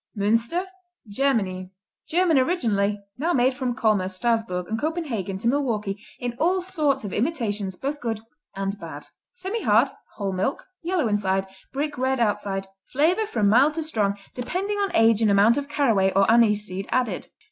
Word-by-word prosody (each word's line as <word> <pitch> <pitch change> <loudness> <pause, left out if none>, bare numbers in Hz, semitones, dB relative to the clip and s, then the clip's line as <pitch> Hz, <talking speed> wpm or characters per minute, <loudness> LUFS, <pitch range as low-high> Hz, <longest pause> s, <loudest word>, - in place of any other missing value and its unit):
Münster 230 - +1 0.4
Germany 200 -6 0 0.4
German 340 -3 +3
originally, 210 - +1 0.2
now 335 +4 +1
made 255 +1 +3
from 255 -2 -2
Colmar, 210 -5 +2
Strassburg 190 -3 -1
and 220 +1 -3
Copenhagen 275 - -2
to 225 +4 -3
Milwaukee 220 -7 -1
in 245 -1 -4
all 360 +3 +2
sorts 300 -8 0
of 200 - -5
imitations, 210 - -1
both 280 +8 -4
good 225 -3 -2 0.4
and 195 +1 -3
bad. - - -8 0.3
Semihard; 450 -1 +2 0.3
whole 195 -2 -2
milk; 185 +9 -1 0.2
yellow 340 -5 0
inside, 195 -2 +1 0.3
brick 290 0 -3
red 260 0 +1
outside; 200 -3 0 0.2
flavor 345 +10 +2
from 215 - +1
mild 265 +9 +5
to 325 - -2
strong, 210 -10 0 0.2
depending 385 +11 -2
on 400 -1 +1
age 225 -1 +5
and 220 - +4
amount 205 +4 +5
of 285 0 -3
caraway 225 -10 +2
or 195 +1 +4
anise 210 -3 +4
seed 190 +1 -5
added. 255 -2 -1
230 Hz, 160 wpm, -24 LUFS, 200-290 Hz, 0.4 s, mild